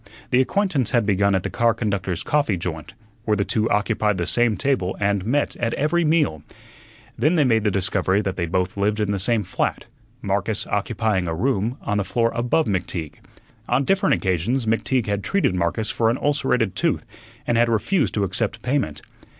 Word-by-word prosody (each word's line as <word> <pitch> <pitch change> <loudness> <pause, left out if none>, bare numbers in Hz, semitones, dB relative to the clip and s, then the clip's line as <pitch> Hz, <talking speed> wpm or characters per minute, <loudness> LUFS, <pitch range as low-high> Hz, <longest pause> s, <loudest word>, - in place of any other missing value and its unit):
The 125 - +5
acquaintance 155 - 0
had 120 -3 +2
begun 100 0 +2
at 95 - 0
the - - -2
car 115 -2 +2
conductors' 100 -6 -2
coffee 145 -10 +1
joint, 80 -3 -6 0.3
where 105 -1 +1
the 100 - 0
two 110 0 0
occupied 105 -1 +1
the 85 - -1
same 120 0 +2
table 130 -10 0
and 100 -1 +1
met 145 +4 0
at 115 0 -1
every 170 +4 +1
meal. 150 - +1 0.8
Then 155 +9 +3
they 155 - +4
made 115 -5 +2
the 105 - +2
discovery 95 0 +1
that 95 -2 -2
they 85 -2 -2
both 90 +2 -1
lived 105 +2 0
in 105 -1 0
the 100 - -1
same 110 +2 +1
flat, - - -2 0.4
Marcus - - -1
occupying 105 -5 -1
a 80 - -2
room 120 +3 0
on 105 0 -1
the - - +1
floor 115 +4 0
above 120 +7 +1
McTeague. 90 -5 -3 0.5
On 125 +3 +2
different 190 -4 +2
occasions 100 +8 -1
McTeague 115 +2 0
had 100 -1 -2
treated 195 - +1
Marcus 90 +5 0
for 115 -1 +1
an 120 - 0
ulcerated 130 -7 0
tooth - - 0 0.4
and 120 - +1
had 120 0 +3
refused 115 - +1
to 105 - +1
accept 100 +3 -2
payment. 125 - -1
110 Hz, 190 wpm, -22 LUFS, 95-125 Hz, 0.8 s, The